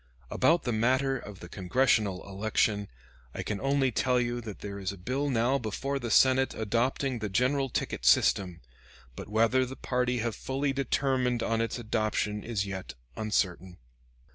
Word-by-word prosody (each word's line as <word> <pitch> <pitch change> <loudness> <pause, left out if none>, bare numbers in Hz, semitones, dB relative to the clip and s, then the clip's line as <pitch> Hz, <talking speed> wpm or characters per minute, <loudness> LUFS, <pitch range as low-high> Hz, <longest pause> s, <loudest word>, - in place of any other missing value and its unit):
About 170 +1 +3
the 120 - -1
matter 130 +4 +2
of 105 -6 -8
the 85 - -8
Congressional 100 0 +1
election, 105 +1 0 0.5
I - - -3
can 105 -2 -3
only 135 -1 +2
tell 125 +2 +2
you 120 0 -1
that 110 -4 -8
there 100 -1 -6
is 95 0 -2
a 100 - -9
bill 130 +10 -2
now 125 +2 +2
before 135 +5 -3
the 120 -2 -4
Senate 130 +3 +4
adopting 120 +4 0
the 105 -1 -3
general 130 +6 +1
ticket - - -3
system; 90 -4 +3 0.5
but - - -8
whether 115 +4 +3
the 130 +1 -5
party 125 -1 -1
have 115 -2 -2
fully 135 +4 -2
determined 130 -3 0
on 115 0 0
its 115 - -2
adoption 110 -2 -1
is 110 -4 -2
yet 95 -8 -6 0.2
uncertain. 95 -4 -1
115 Hz, 165 wpm, -29 LUFS, 105-130 Hz, 0.5 s, Senate